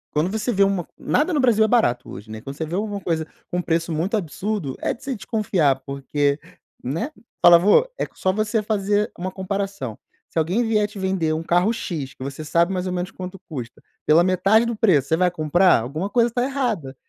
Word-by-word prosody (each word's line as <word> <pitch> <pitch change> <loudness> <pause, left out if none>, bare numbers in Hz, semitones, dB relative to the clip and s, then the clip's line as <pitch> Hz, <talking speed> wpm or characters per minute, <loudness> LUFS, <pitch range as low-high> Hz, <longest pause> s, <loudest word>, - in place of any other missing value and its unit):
Quando 155 +5 +1
você 220 +3 -2
vê 200 -1 +4
um 195 -2 +1 0.2
nada 315 +4 +1
no 295 - +2
Brasil 225 -4 +4
é - - +1
barato 215 - +2
hoje, 105 +3 -9
né, 110 - -6
quando 135 +5 -8
você 160 - -3
vê 160 - -8
alguma 205 +1 -2
coisa 165 -3 -1 0.3
com 180 - -1
um 180 - +1
preço 165 0 -1
muito 165 +7 0
absurdo, 195 -4 -3
é - - 0
de 235 - -15
se 270 0 -2
desconfiar, 190 - 0
porque, 140 +1 -1 0.4
né. 165 - -3 0.3
Fala: 175 -1 +9
"Vô, 205 - +5
é - - -1
só 185 - 0
você 215 +2 0
fazer 205 0 0
uma 185 +1 -2
comparação, 190 - -4 0.3
se - - -1
alguém 180 +9 +1
vier 215 -2 +2
te 210 - -12
vender 190 -5 0
um 160 +1 -2
carro 175 +7 +2
X 155 - -5
que 130 - -9
você 140 +3 -6
sabe 170 +4 +2
mais 185 -1 -2
ou 180 - -2
menos 180 +1 -3
quanto 185 +1 -7
custa, 125 -6 -7 0.2
pela 165 +3 +5
metade 195 +5 +3
do 235 - -1
preço, 175 - +2
você 160 - +3
vai 180 0 +3
comprar? 175 -1 +3
Alguma 155 - -4
coisa 235 +2 +2
tá 245 +1 0
errada!", 235 - -2
185 Hz, 220 wpm, -22 LUFS, 155-210 Hz, 0.4 s, Fala